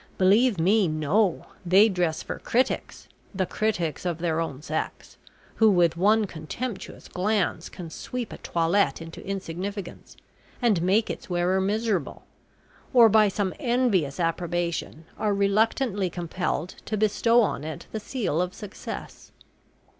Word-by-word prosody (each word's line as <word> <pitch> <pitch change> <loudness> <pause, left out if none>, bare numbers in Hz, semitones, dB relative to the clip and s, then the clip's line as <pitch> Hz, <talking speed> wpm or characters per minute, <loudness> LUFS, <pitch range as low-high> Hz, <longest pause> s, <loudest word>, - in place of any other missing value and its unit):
Believe 205 +2 +4
me, 195 +4 +4
no 160 +5 +1 0.2
they 190 +4 +6
dress 175 -6 -1
for - - -6
critics, 255 +3 -1 0.3
the 185 -1 +1
critics 175 -7 -1
of 175 -3 -1
their 165 -1 -1
own 150 -4 -4
sex, 155 0 -4 0.4
who 220 -1 +6
with 175 -4 +3
one 210 +5 +3
contemptuous 195 +7 -6
glance 190 -3 -1
can 170 -3 -9
sweep 245 +6 -5
a - - -9
toilette 170 -2 +1
into 165 0 -9
insignificance, 195 +1 -6 0.4
and 220 -8 +2
make 195 +5 +2
its - - -8
wearer 180 +2 +1
miserable, 205 -4 -1 0.7
or, 235 -2 +8
by 215 0 +5
some 195 -1 -1
envious 230 - +1
approbation, 170 -1 -2
are 210 -2 +1
reluctantly 200 0 +1
compelled 175 0 -3
to 215 - -2
bestow 220 +3 +3
on 195 - -2
it 155 -2 -6
the 220 - -3
seal 210 - -1
of 180 0 -3
success. 210 -2 -8
190 Hz, 135 wpm, -26 LUFS, 170-215 Hz, 0.7 s, or